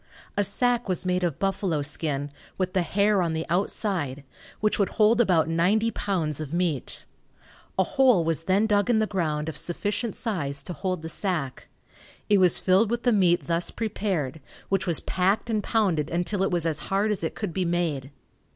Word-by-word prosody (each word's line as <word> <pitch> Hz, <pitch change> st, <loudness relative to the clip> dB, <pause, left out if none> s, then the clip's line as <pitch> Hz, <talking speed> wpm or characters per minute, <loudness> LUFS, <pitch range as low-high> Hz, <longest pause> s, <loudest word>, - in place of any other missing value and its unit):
A 205 Hz, -, +2 dB
sack 240 Hz, +3 st, +1 dB
was 185 Hz, -1 st, -1 dB
made 180 Hz, 0 st, 0 dB
of 170 Hz, -5 st, -1 dB
buffalo 190 Hz, -6 st, -1 dB
skin, 145 Hz, -1 st, -2 dB, 0.3 s
with 185 Hz, -1 st, -1 dB
the 185 Hz, -, +2 dB
hair 200 Hz, +4 st, +2 dB
on 170 Hz, -2 st, 0 dB
the 160 Hz, 0 st, -2 dB
outside, 175 Hz, -, -1 dB, 0.4 s
which 215 Hz, 0 st, +1 dB
would 200 Hz, -, +2 dB
hold 220 Hz, +2 st, +5 dB
about 175 Hz, -8 st, +3 dB
ninety 190 Hz, +8 st, +2 dB
pounds 165 Hz, -10 st, -2 dB
of 150 Hz, -2 st, -6 dB
meat. 170 Hz, -6 st, -2 dB, 0.7 s
A -, -, +4 dB
hole 260 Hz, -, +3 dB
was 165 Hz, 0 st, -1 dB
then 195 Hz, +4 st, +3 dB
dug 205 Hz, +1 st, +2 dB
in 235 Hz, -, +4 dB
the 220 Hz, -, +2 dB
ground 155 Hz, -7 st, -2 dB
of 160 Hz, -, -4 dB
sufficient 205 Hz, +7 st, -2 dB
size 145 Hz, -, -3 dB
to 180 Hz, -, -5 dB
hold 180 Hz, +2 st, -3 dB
the -, -, -4 dB
sack. 160 Hz, -5 st, -2 dB, 0.6 s
It 205 Hz, -1 st, +5 dB
was 180 Hz, -2 st, +5 dB
filled 195 Hz, +4 st, +3 dB
with 235 Hz, 0 st, -2 dB
the 245 Hz, -, +3 dB
meat 180 Hz, -4 st, +3 dB
thus 170 Hz, 0 st, 0 dB
prepared, 185 Hz, -, -3 dB, 0.3 s
which 195 Hz, -1 st, 0 dB
was 170 Hz, -3 st, +2 dB
packed 195 Hz, +5 st, 0 dB
and 215 Hz, -1 st, +1 dB
pounded 185 Hz, -9 st, 0 dB
until 175 Hz, +4 st, -1 dB
it 195 Hz, -, +2 dB
was 175 Hz, -2 st, +1 dB
as 160 Hz, -2 st, +1 dB
hard 200 Hz, +2 st, +1 dB
as 200 Hz, -5 st, -2 dB
it 160 Hz, -, -2 dB
could 205 Hz, -6 st, -4 dB
be 185 Hz, -, 0 dB
made. 170 Hz, -6 st, -1 dB
180 Hz, 190 wpm, -26 LUFS, 160-205 Hz, 0.7 s, hold